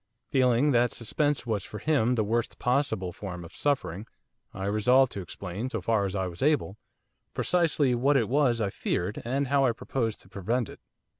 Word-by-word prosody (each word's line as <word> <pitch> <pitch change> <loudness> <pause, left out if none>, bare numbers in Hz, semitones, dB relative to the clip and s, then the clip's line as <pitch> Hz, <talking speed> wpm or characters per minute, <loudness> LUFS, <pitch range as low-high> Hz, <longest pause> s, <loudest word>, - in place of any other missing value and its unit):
Feeling 130 +1 +3
that 120 -1 +3
suspense 145 +4 -1
was 110 -5 -1
for 105 - -7
him 125 -1 +2
the 110 - +1
worst 115 +3 -1
possible 125 -8 0
form 90 -2 -7
of 85 - -12
suffering 115 - -1 0.4
I 95 0 -5
resolved 125 +6 +4
to 100 - -5
explain, 95 +6 -5
so 115 - -3
far 105 +1 +1
as 95 0 -3
I 95 -1 0
was 90 -1 -6
able, 140 -8 +1 0.6
precisely 160 -7 +2
what 135 +4 +3
it 115 -5 +1
was 125 -3 +2
I 100 -2 0
feared, 95 +2 -2
and 135 +3 -1
how 140 0 +3
I 125 -3 +3
proposed 115 -2 -3
to - - -18
prevent 110 +5 -2
it. - - -11
115 Hz, 190 wpm, -28 LUFS, 100-135 Hz, 0.6 s, resolved